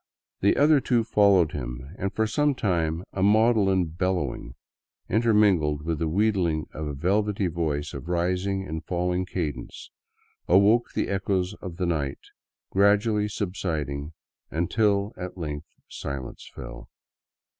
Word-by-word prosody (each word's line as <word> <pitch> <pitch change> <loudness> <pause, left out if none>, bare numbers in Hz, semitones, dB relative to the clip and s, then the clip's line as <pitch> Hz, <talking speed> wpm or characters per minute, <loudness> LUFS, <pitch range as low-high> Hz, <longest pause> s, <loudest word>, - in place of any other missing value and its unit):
The 100 - +3
other 150 0 +5
two 120 -3 +2
followed 100 -7 +4
him, 60 +3 -6
and 100 0 -2
for 110 - 0
some 145 +6 +1
time 85 -6 0
a 95 - -2
maudlin 105 -3 +4
bellowing, 80 -7 -2 0.5
inter 115 +3 +2
mingled 85 -9 +3
with 80 -1 -2
the 80 - 0
wheedling 90 -4 +1
of 75 -1 -4
a 75 - -4
velvety 100 +6 +1
voice 80 -4 -2
of - - -7
rising 90 +2 0
and 80 +1 -5
falling 90 +2 -1
cadence, 75 -9 -5 0.6
awoke 105 +6 +4
the - - 0
echoes 95 -1 -1
of 90 -4 -7
the 90 - -1
night, 75 -5 -1 0.5
gradually 105 +2 +3
subsiding 80 -8 -3 0.4
until 100 +5 +1
at 90 0 -6
length 75 -2 -5 0.2
silence 70 -2 -7
fell. - - -9
90 Hz, 135 wpm, -26 LUFS, 80-100 Hz, 0.6 s, other